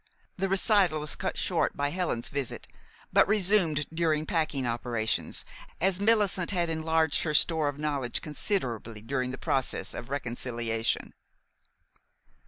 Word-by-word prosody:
The 195 +1 -1
recital 195 -4 +3
was 150 0 +1
cut - - -3
short - - 0
by 145 0 0
Helen's 170 -9 -1
visit, 140 -3 -4 0.5
but - - +6
resumed 190 -7 +3
during 160 -2 +1
packing 155 -5 0
operations, 115 -1 -1 0.3
as 190 +1 +1
Millicent 205 -4 +2
had 175 -4 0
enlarged 160 -1 +2
her 155 -2 0
store 160 -1 +4
of 145 - -6
knowledge 145 -5 -1
considerably 120 - -3
during 125 +2 -2
the 130 - -5
process 130 0 -1
of 120 - -7
reconciliation. 120 -4 -2
150 Hz, 130 wpm, -28 LUFS, 125-175 Hz, 0.5 s, but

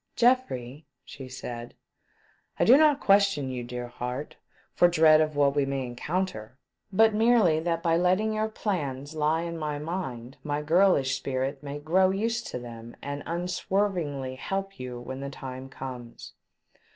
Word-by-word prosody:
" - - -48
Geoffrey," 150 - +1 0.2
she 135 -2 -9
said, 120 -2 -7 0.4
" - - -34
I - - +4
do 245 - +8
not 300 -1 +5
question 195 -9 +3
you, 125 -1 -4
dear 125 0 -5
heart, 125 +4 -5 0.4
for 175 - +5
dread 160 -2 +6
of 155 -1 0
what 140 -1 +3
we 145 - +3
may 135 -1 -2
encounter, 125 - -3 0.3
but 220 +3 +5
merely 215 -7 +4
that 165 0 -1
by 165 -1 +3
letting 185 +5 +2
your 215 0 0
plans 145 - -3
lie 155 +1 +1
in 170 -1 -5
my 150 -1 -2
mind 145 -6 -5
my 150 0 -2
girlish 160 -4 +3
spirit 135 +1 -3
may 145 0 -6
grow 180 +6 +3
used 225 +4 -1
to - - -5
them 115 -1 -9
and 145 0 -4
unswervingly 175 -6 -1
help 195 +6 -4
you 125 -1 -6
when 130 +2 -7
the 140 0 -5
time 130 -1 -8
comes." 125 -3 -8
150 Hz, 165 wpm, -27 LUFS, 130-185 Hz, 0.4 s, do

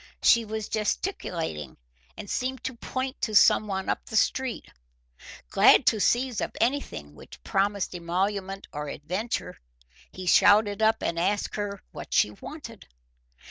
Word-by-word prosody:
She 235 -1 +5
was 220 0 -4
gesticulating, 170 - -3 0.4
and - - -7
seemed 255 +3 -3
to 260 - -3
point 260 +2 -5
to 215 -2 -1
someone 195 -2 +4
up - - -2
the 220 - -6
street. 260 +2 0 0.9
Glad - - +6
to 220 - +3
seize 245 +3 +1
at - - -4
anything 230 - -1
which - - -14
promised 200 0 0
emolument 190 +3 -2
or 150 0 -4
adventure, 185 +11 -4 0.5
he 185 - -8
shouted 205 +3 +5
up 220 +1 +3
and 170 - -1
asked 200 +4 0
her 205 -1 -4
what - - -6
she - - +4
wanted. 230 -9 -10
205 Hz, 140 wpm, -26 LUFS, 185-230 Hz, 0.9 s, Glad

